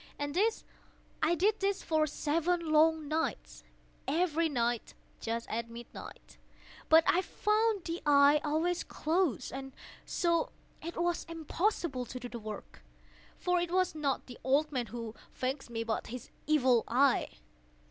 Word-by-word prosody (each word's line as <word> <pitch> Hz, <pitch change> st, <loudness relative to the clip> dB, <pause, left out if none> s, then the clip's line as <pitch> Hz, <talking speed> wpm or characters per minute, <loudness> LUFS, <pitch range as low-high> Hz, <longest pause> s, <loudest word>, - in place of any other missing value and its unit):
And 290 Hz, 0 st, -3 dB
this 430 Hz, +6 st, +1 dB, 0.6 s
I 325 Hz, +2 st, +3 dB
did 410 Hz, +6 st, +2 dB
for 315 Hz, -4 st, +1 dB
seven 330 Hz, +3 st, 0 dB
long 315 Hz, 0 st, +4 dB
nights—every 325 Hz, +1 st, -2 dB
night 240 Hz, -4 st, -1 dB, 0.2 s
just 230 Hz, +1 st, -3 dB
at 230 Hz, +1 st, -3 dB
midnight—but 240 Hz, +6 st, -2 dB
I 360 Hz, -, +4 dB
found 425 Hz, 0 st, +1 dB
the 335 Hz, +1 st, -3 dB
eye 285 Hz, 0 st, +6 dB
always 325 Hz, +4 st, 0 dB
closed; 315 Hz, -7 st, 0 dB
and 270 Hz, 0 st, -6 dB, 0.3 s
so 340 Hz, -2 st, +1 dB, 0.3 s
it 335 Hz, +2 st, -6 dB
was 345 Hz, 0 st, 0 dB
impossible 330 Hz, -, -1 dB
to 255 Hz, +2 st, -7 dB
do 245 Hz, -, -6 dB
the 235 Hz, -1 st, -7 dB
work; 215 Hz, -1 st, -8 dB, 0.6 s
for 360 Hz, 0 st, +1 dB
it 345 Hz, 0 st, -1 dB
was 370 Hz, 0 st, +2 dB
not 290 Hz, -4 st, -1 dB
the 245 Hz, -, -11 dB
old 285 Hz, +4 st, +2 dB
man 250 Hz, -4 st, -1 dB
who 230 Hz, 0 st, -6 dB, 0.2 s
vexed 260 Hz, +1 st, -3 dB
me, 230 Hz, -1 st, -2 dB
but 225 Hz, -1 st, -2 dB
his 250 Hz, +1 st, -8 dB, 0.2 s
Evil 260 Hz, -6 st, +4 dB
Eye. 265 Hz, +3 st, +3 dB
305 Hz, 135 wpm, -32 LUFS, 255-340 Hz, 0.6 s, eye